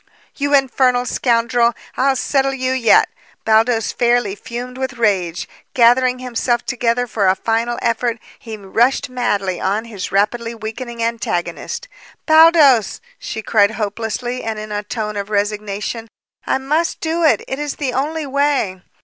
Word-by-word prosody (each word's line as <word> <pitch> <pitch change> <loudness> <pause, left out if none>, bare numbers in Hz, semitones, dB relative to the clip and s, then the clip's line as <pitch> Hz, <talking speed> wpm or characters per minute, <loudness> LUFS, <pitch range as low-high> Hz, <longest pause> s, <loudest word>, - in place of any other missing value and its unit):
"You 285 0 +1
infernal 255 -2 +2
scoundrel! 235 -1 +1 0.2
I'll 270 +1 +2
settle 270 0 0
you 260 -1 -1
yet!" 255 -4 +4 0.4
Baldos 225 +1 +3
fairly 240 -4 +1
fumed 245 +5 -7
with 260 -1 -2
rage. 190 -7 0 0.3
Gathering 250 +1 +4
himself 240 -1 -1
together 245 -1 0
for 215 -4 0
a 185 - +4
final 230 +3 -1
effort, 235 +1 0 0.2
he 225 -2 -8
rushed 240 +7 0
madly 205 -8 -1
on 205 +4 -1
his 210 -5 -6
rapidly 230 +4 0
weakening 230 +1 -6
antagonist. 225 - -3 0.4
"Baldos!" 315 - +5 0.2
she 220 - -6
cried 205 -2 +3
hopelessly 225 +4 -3
and 220 -1 -3
in 215 0 -7
a 205 0 -2
tone 210 0 -4
of 200 0 -4
resignation. 210 +2 -2 0.4
"I - - +2
must 300 +5 -1
do 330 +1 -1
it! 315 - +3
It 265 - -4
is 295 -1 -3
the 265 -4 -3
only 305 +4 -2
way!" 275 -9 0
235 Hz, 145 wpm, -18 LUFS, 215-260 Hz, 0.4 s, Baldos